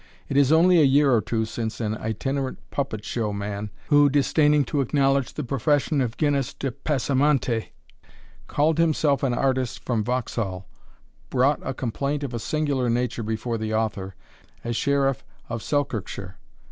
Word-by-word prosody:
It 135 - -2
is 140 0 +4
only 170 +2 +6
a - - +6
year 140 0 +4
or 115 - +4
two 110 0 -1
since 110 0 -4
an 110 -2 -1
itinerant 130 +5 -3
puppet 115 -7 -3
show 110 -2 -2
man, 100 +1 -4 0.2
who, 145 -1 +6
disdaining 145 +1 +3
to 140 +3 0
acknowledge 135 0 +1
the 150 - -3
profession 140 +3 +1
of 120 -2 -2
Gines 145 -4 0
de 135 - -3
Passamonte, 135 -3 0 0.8
called 155 +2 +1
himself 155 -3 +2
an 130 -3 +1
artist 130 -2 -1
from 115 -4 0
Vauxhall, 105 -6 -2 0.6
brought 135 +3 +2
a 135 - -4
complaint 140 +4 -2
of 135 -3 -4
a 120 - -2
singular 140 -1 0
nature 120 0 -1
before 110 +1 -3
the 110 0 -2
author, 100 -4 -2 0.5
as 120 0 -2
Sheriff 140 0 +1 0.3
of 115 -1 -4
Selkirkshire. 110 -10 -3
130 Hz, 155 wpm, -24 LUFS, 115-145 Hz, 0.8 s, only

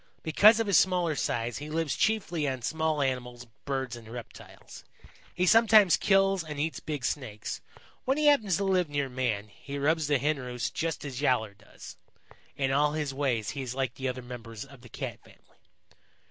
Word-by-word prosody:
Because 210 +8 +6
of 225 - +1
his 200 -4 +5
smaller 180 -4 +1
size, 120 -3 -2
he 150 +1 -7
lives 160 -2 -1
chiefly 180 -8 0
on 130 -3 -3
small 160 +1 0
animals, 125 -2 -3 0.2
birds 130 -3 -2
and 115 -2 -12
reptiles. 120 -1 -11 0.5
He 180 - +1
sometimes 215 -2 +6
kills 195 -2 +3
and 150 -2 -7
eats 155 -2 -2
big 145 -5 -4
Snakes. 110 -8 -4 0.4
When 265 +2 +1
he 305 - +1
happens 225 - +4
to 200 - -1
live 185 -4 +1
near 145 -2 -1
man, 120 -5 -2
he 140 +7 -8
robs 155 +2 +1
the 145 -1 +3
Hen 145 +3 0
roosts 125 -1 -4
just 165 -2 -3
as 135 -2 -5
Yowler 110 -7 +1
does. - - -13 0.6
In 135 -1 0
all 145 +2 +2
his 150 -3 -2
ways 130 -6 -1
he 140 - -5
is 130 -1 -5
like 130 -3 -1
the 135 0 -4
other 130 0 -4
members 115 -2 -8
of 135 -2 -16
the 120 - -14
Cat - - -6
family. - - -21
145 Hz, 190 wpm, -28 LUFS, 125-165 Hz, 0.6 s, Because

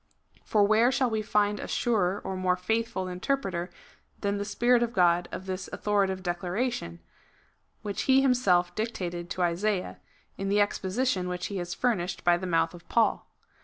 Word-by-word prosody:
For 210 -2 +2
where 220 +4 +4
shall 260 -2 +1
we 220 -1 0
find 210 -1 +1
a - - -5
surer 200 -5 +1
or 190 - -4
more 185 -1 +1
faithful 220 0 -1
interpreter 185 -2 -2 0.5
than 200 0 -1
the 205 - -2
Spirit 240 +3 +3
of 235 0 -1
God 175 -1 +3
of 190 - -6
this 190 0 -5
authoritative 195 -2 0
declaration, 175 - -2 0.8
which 205 -2 -3
He 265 0 +7
himself 245 -10 +3
dictated 175 -6 -4
to 180 - -1
Isaiah 180 +3 -1 0.2
— - - -38
in 195 0 -2
the 205 +1 +3
exposition 205 0 0
which 180 0 -3
He - - -2
has 175 -1 -4
furnished 195 -7 -1
by 175 0 +5
the 185 +2 -4
mouth 165 -1 +1
of 175 -1 -14
Paul. 230 -1 +2
195 Hz, 170 wpm, -28 LUFS, 180-220 Hz, 0.8 s, He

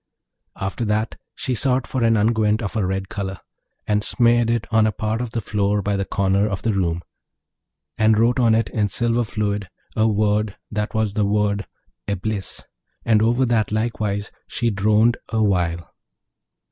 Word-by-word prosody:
After 95 +5 -3
that 110 +1 0 0.2
she 130 - -2
sought 125 +1 +1
for 130 -3 -2
an 115 -1 +4
unguent 110 0 +2
of 100 - -4
a 110 - +1
red 95 +1 -2
colour, 100 -2 -4 0.5
and 105 0 +1
smeared 120 0 +3
it 115 -1 0
on 110 -1 +4
a - - +1
part 110 +3 -2
of 125 - -3
the 115 0 -3
floor 105 0 0
by 100 +1 0
the 100 0 -1
corner 100 +1 +1
of 95 -3 -4
the 115 - +1
room, 85 -3 -1 1.0
and 110 0 +4
wrote 120 +3 +3
on 115 -3 +4
it 115 -1 +1
in 105 -2 0
silver 120 +3 +1
fluid 105 -3 -2 0.3
a 110 0 +3
word 105 -1 +1
that 105 +1 -3
was 110 -2 0
the 105 -2 +1
word 105 0 0 0.4
'Eblis,' 100 0 -3 0.4
and 110 -2 +4
over 120 +4 +3
that 115 -4 +1
likewise 105 -2 -1 0.2
she 120 -1 -1
droned 105 +3 +3
awhile. 90 -6 0
105 Hz, 170 wpm, -22 LUFS, 100-115 Hz, 1.0 s, an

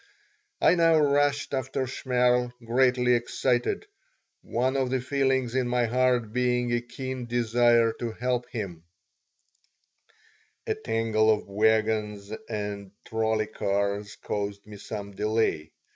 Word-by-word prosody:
I - - +5
now 165 -2 +4
rushed 145 -1 +2
after 130 0 -1
Shmerl, 125 -1 +1
greatly 125 +1 +3
excited, 120 - 0 0.6
one 130 +3 -1
of 130 -2 +1
the 130 0 0
feelings 130 -2 0
in 130 -1 +1
my 120 0 +1
heart 120 -2 +1
being 125 -1 +1
a 120 - +1
keen 130 0 -6
desire 120 -1 +3
to 120 -1 -3
help 125 +1 -2
him 95 -8 -5 1.8
A - - 0
tangle 110 -1 +1
of 110 -1 +1
wagons 105 0 0 0.2
and 105 -2 -4 0.2
trolley 110 -1 0
cars 100 +1 -2
caused 100 -1 -4
me 105 -1 -11
some 100 0 -7
delay. 105 -7 -1
120 Hz, 120 wpm, -27 LUFS, 110-125 Hz, 1.8 s, I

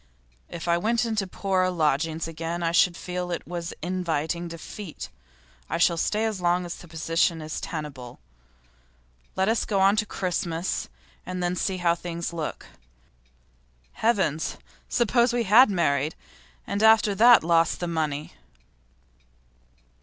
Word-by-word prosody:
If 170 0 -7
I 170 0 +3
went 230 +4 +1
into 215 -4 -1
poorer 185 0 0
lodgings 160 -1 0
again 165 +1 -4
I 165 - +1
should 175 0 +3
feel 180 0 -4
it 175 - -4
was 170 -1 -5
inviting 170 -1 -2
defeat. 165 +2 -8 0.6
I - - -1
shall 170 0 +3
stay 210 +6 0
as 215 -4 -2
long 175 +1 +1
as 175 - -5
the 175 - -12
position 165 +1 0
is 155 0 -5
tenable. 140 -6 -6 1.2
Let 190 0 +1
us 225 +1 +2
get 205 - -1
on 195 +2 +5
to 215 -1 +1
Christmas, 175 -2 -2 0.3
and 185 0 -4
then 175 0 0
see 185 +1 -1
how 175 -2 +2
things 170 0 -5
look. 160 -3 -5 1.3
Heavens! 190 -9 0 0.3
Suppose 240 +1 +2
we 240 -1 +1
had 225 +5 +7
married, 155 -5 0 0.5
and 200 +1 -2
after 220 -1 +5
that 235 +1 +7
lost 165 0 +2
the 175 - -3
money! 155 -3 -2
175 Hz, 140 wpm, -25 LUFS, 165-195 Hz, 1.3 s, had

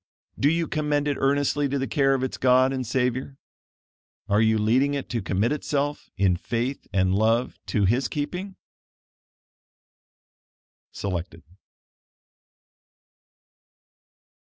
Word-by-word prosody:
Do 140 - +4
you 165 +1 0
commend 150 -1 0
it 145 - 0
earnestly 145 +1 +1
to 140 - -1
the 135 - -1
care 135 -1 +2
of 130 - -2
its 130 - -2
God 130 +1 +3
and 130 -3 -3
Savior? 130 +2 -1 0.9
Are 105 0 +3
you 110 0 +3
leading 130 +7 +2
it 140 - -5
to 120 -3 -2
commit 100 +4 0
itself, 145 0 -2
in 95 -2 +2
faith 120 +7 -3
and 95 -1 +2
love 115 +4 +1
to 105 -4 +1
his 120 +6 +2
keeping? 180 +6 -4 2.4
Selected. 90 -4 -5
130 Hz, 115 wpm, -25 LUFS, 110-145 Hz, 2.4 s, Do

